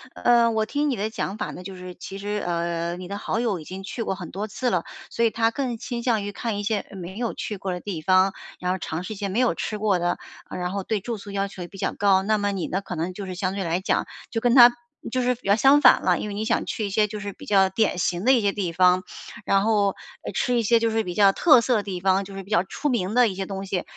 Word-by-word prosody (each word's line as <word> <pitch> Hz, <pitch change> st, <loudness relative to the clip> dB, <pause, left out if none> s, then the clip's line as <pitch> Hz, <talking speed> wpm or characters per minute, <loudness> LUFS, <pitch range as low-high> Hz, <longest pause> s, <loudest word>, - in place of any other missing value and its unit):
呃， 235 Hz, -1 st, +4 dB
我 220 Hz, -1 st, +1 dB
听 290 Hz, +5 st, -1 dB
你 265 Hz, -, 0 dB
的 215 Hz, +1 st, -2 dB
讲 215 Hz, -1 st, -4 dB
法 -, -, -3 dB
呢， -, -, -9 dB
就 190 Hz, +1 st, -8 dB
是 180 Hz, 0 st, -8 dB
其 195 Hz, -, -8 dB
实， 205 Hz, +1 st, -3 dB
呃， 170 Hz, 0 st, -2 dB
你 180 Hz, 0 st, -8 dB
的 200 Hz, -, -4 dB
好 220 Hz, -, -2 dB
友 220 Hz, -7 st, 0 dB
已 -, -, -9 dB
经 190 Hz, +1 st, -7 dB
去 215 Hz, +4 st, -5 dB
过 195 Hz, -4 st, -1 dB
很 180 Hz, -4 st, -8 dB
多 205 Hz, +4 st, -4 dB
次 250 Hz, +4 st, -2 dB
了， 180 Hz, -7 st, 0 dB, 0.3 s
所 235 Hz, -, +1 dB
以 -, -, +4 dB
他 225 Hz, +1 st, +1 dB
更 245 Hz, -1 st, -3 dB
倾 240 Hz, +1 st, -5 dB
向 230 Hz, -4 st, +1 dB
于 205 Hz, -, -4 dB
看 225 Hz, 0 st, -3 dB
一 205 Hz, -, -3 dB
些， 215 Hz, +1 st, 0 dB
呃， -, -, -12 dB
没 185 Hz, +1 st, -8 dB
有 235 Hz, -1 st, -2 dB
去 210 Hz, -, -5 dB
过 190 Hz, -1 st, -3 dB
的 180 Hz, -, -5 dB
地 185 Hz, -6 st, -5 dB
方， 185 Hz, +3 st, +4 dB, 0.3 s
然 180 Hz, 0 st, -1 dB
后 185 Hz, -, -1 dB
尝 165 Hz, 0 st, -4 dB
试 215 Hz, -, -5 dB
一 -, -, -9 dB
些 200 Hz, 0 st, -3 dB
没 195 Hz, +4 st, -1 dB
有 250 Hz, -2 st, +2 dB
吃 215 Hz, -, -3 dB
过 205 Hz, -3 st, +1 dB
的， 175 Hz, 0 st, 0 dB, 0.3 s
然 180 Hz, 0 st, -3 dB
后 200 Hz, 0 st, -3 dB
对 210 Hz, +1 st, -1 dB
住 235 Hz, +2 st, -4 dB
宿 200 Hz, 0 st, -10 dB
要 200 Hz, 0 st, -1 dB
求 195 Hz, -2 st, -10 dB
也 -, -, -7 dB
比 195 Hz, -, -13 dB
较 -, -, -1 dB
高。 195 Hz, -2 st, +3 dB
那 215 Hz, +2 st, +2 dB
么 205 Hz, 0 st, 0 dB
你 190 Hz, -3 st, -3 dB
呢， 190 Hz, +2 st, -2 dB
可 180 Hz, -, -6 dB
能 170 Hz, +3 st, -3 dB
就 200 Hz, +2 st, -6 dB
是 185 Hz, -1 st, -6 dB
相 185 Hz, 0 st, -2 dB
对 200 Hz, -, -2 dB
来 170 Hz, +2 st, -1 dB
讲， -, -, 0 dB, 0.2 s
就 230 Hz, -, -2 dB
跟 245 Hz, +1 st, +2 dB
他 240 Hz, -2 st, +10 dB, 0.4 s
就 255 Hz, +1 st, 0 dB
是 250 Hz, +1 st, +2 dB
比 245 Hz, -4 st, -11 dB
较 200 Hz, -, +5 dB
相 275 Hz, +6 st, +5 dB
反 -, -, +6 dB
了， -, -, +2 dB
因 -, -, -4 dB
为 -, -, -5 dB
你 215 Hz, +2 st, -2 dB
想 230 Hz, -, +1 dB
去 215 Hz, -, -2 dB
一 -, -, -3 dB
些 210 Hz, +1 st, +3 dB
就 210 Hz, 0 st, -6 dB
是 205 Hz, -1 st, -5 dB
比 -, -, -13 dB
较 195 Hz, -2 st, +4 dB
典 195 Hz, 0 st, +1 dB
型 175 Hz, +1 st, -1 dB
的 260 Hz, -, +5 dB
一 250 Hz, -, +4 dB
些 200 Hz, -1 st, +2 dB
地 195 Hz, -4 st, -2 dB
方。 180 Hz, +1 st, +4 dB, 0.4 s
然 195 Hz, 0 st, +3 dB
后， 205 Hz, -3 st, +2 dB, 0.3 s
呃， -, -, -4 dB
吃 250 Hz, -, 0 dB
一 -, -, +3 dB
些 230 Hz, +2 st, +4 dB
就 230 Hz, 0 st, +1 dB
是 225 Hz, 0 st, +1 dB
比 180 Hz, -, -5 dB
较 200 Hz, -2 st, +6 dB
特 295 Hz, -, +6 dB
色 245 Hz, +1 st, +1 dB
的 210 Hz, -, +2 dB
地 190 Hz, -3 st, -4 dB
方， 190 Hz, +1 st, +2 dB
就 195 Hz, 0 st, -10 dB
是 195 Hz, -, -6 dB
比 195 Hz, -, -16 dB
较 175 Hz, -4 st, +3 dB
出 295 Hz, +9 st, -4 dB
名 215 Hz, -7 st, 0 dB
的 245 Hz, -1 st, +6 dB
一 200 Hz, -, -2 dB
些 195 Hz, 0 st, -3 dB
东 195 Hz, 0 st, -5 dB
西， 185 Hz, -2 st, -2 dB
200 Hz, 330 characters per minute, -24 LUFS, 185-225 Hz, 0.4 s, 他